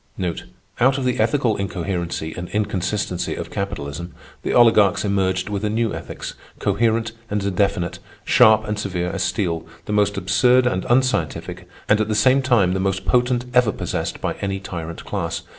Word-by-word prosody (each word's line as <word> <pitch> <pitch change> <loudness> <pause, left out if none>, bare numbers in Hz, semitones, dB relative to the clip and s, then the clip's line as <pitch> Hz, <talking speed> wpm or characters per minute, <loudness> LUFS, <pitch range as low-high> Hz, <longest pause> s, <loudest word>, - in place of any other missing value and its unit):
Out 130 +2 +4
of 135 - -2
the 125 - 0
ethical 115 0 +2
incoherency 90 -4 -3
and 90 0 -6
inconsistency 100 -2 -1
of - - -6
capitalism, 85 -4 -5 0.3
the - - -2
oligarchs 110 -5 +5
emerged 95 -2 0
with 105 0 -3
a 105 - +1
new 115 0 0
ethics, - - -6 0.2
coherent 115 +2 +1 0.2
and 100 -2 -1
definite, 90 -3 0 0.3
sharp 110 0 +5
and 105 0 -2
severe 90 -3 -2
as 95 - -3
steel, 90 -4 -1 0.2
the 105 - -3
most 100 -1 +2
absurd 100 +7 +3
and 95 -7 0
unscientific 130 +1 0 0.2
and 105 0 +4
at 110 - 0
the 110 - -1
same 130 +6 +4
time 115 -9 +3
the 95 - -1
most 95 0 -1
potent 125 0 +2
ever 125 -4 +4
possessed - - -3
by - - -2
any 100 0 -2
tyrant 85 -4 -7
class. 85 -5 -3
100 Hz, 165 wpm, -21 LUFS, 95-115 Hz, 0.3 s, oligarchs